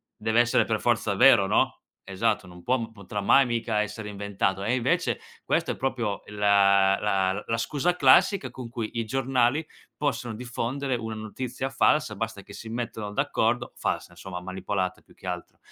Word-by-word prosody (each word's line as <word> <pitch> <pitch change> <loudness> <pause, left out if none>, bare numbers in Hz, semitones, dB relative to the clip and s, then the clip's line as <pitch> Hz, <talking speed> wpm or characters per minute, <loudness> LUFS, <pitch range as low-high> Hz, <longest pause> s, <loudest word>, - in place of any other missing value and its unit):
dev'essere 115 +2 +3
per - - -1
forza - - +1
vero, - - +6
no?" - - +1 0.3
Esatto, 100 +1 0
non 90 -1 -13
può 115 +1 -1
potrà 105 -1 -6
mai 130 +6 +5
mica 115 -2 0
essere 105 0 -5
inventato 100 -1 -2
e 120 +4 +1
invece 125 - 0 0.2
questo - - 0
è - - -3
proprio 120 -6 -2
la 100 -1 +4
la 95 -1 0
la 115 - 0
scusa 150 +9 0
classica 160 - +4
con 125 -2 -8
cui 115 -2 -4
i 115 - -1
giornali 130 +4 +1 0.3
possono 125 -5 -2
diffondere 125 +3 -3
una 110 -1 -5
notizia 125 +4 -4
falsa, 140 -4 +2
basta 110 -1 -4
che 100 - -13
si 110 +2 -9
mettano 115 -3 -4
d'accordo; 115 +3 0
falsa - - -2
insomma, 90 -2 -7
manipolata 95 0 -3
più - - -23
che - - -16
altro, - - -5
110 Hz, 165 wpm, -26 LUFS, 100-125 Hz, 0.3 s, vero